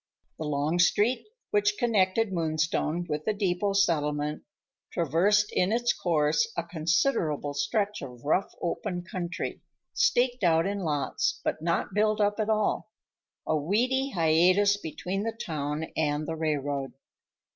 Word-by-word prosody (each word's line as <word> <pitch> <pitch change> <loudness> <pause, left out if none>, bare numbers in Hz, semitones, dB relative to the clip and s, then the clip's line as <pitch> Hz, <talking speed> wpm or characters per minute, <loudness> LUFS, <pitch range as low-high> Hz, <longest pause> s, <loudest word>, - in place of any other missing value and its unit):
The 160 - -3
long 150 +3 0
street 215 - +2 0.2
which 205 0 +2
connected 215 -2 +2
Moonstone 165 0 0
with 150 -1 -3
the 215 - 0
depot 200 0 0
settlement 150 -6 +1 0.5
traversed 185 +6 +2
in 180 +2 +1
its 240 +1 +2
course 150 -3 +1
a 170 - 0
considerable 165 - 0
stretch 210 +5 -1
of 125 -2 -9
rough 185 +6 +1
open 175 +1 -2
country, 175 0 -5 0.3
staked 250 - +2
out 165 -1 +4
in 200 +1 -2
lots 145 -7 -1
but - - -2
not 170 +4 -1
built 215 +1 +2
up 205 +1 +1
at 215 0 0
all, 215 0 0 0.6
a 155 - +1
weedy 245 - +1
hiatus 180 - +4
between 190 +1 -4
the 225 +1 -3
town 150 -1 -3
and 150 -1 0
the 165 - -2
railroad. 145 -3 -2
175 Hz, 135 wpm, -28 LUFS, 155-205 Hz, 0.6 s, out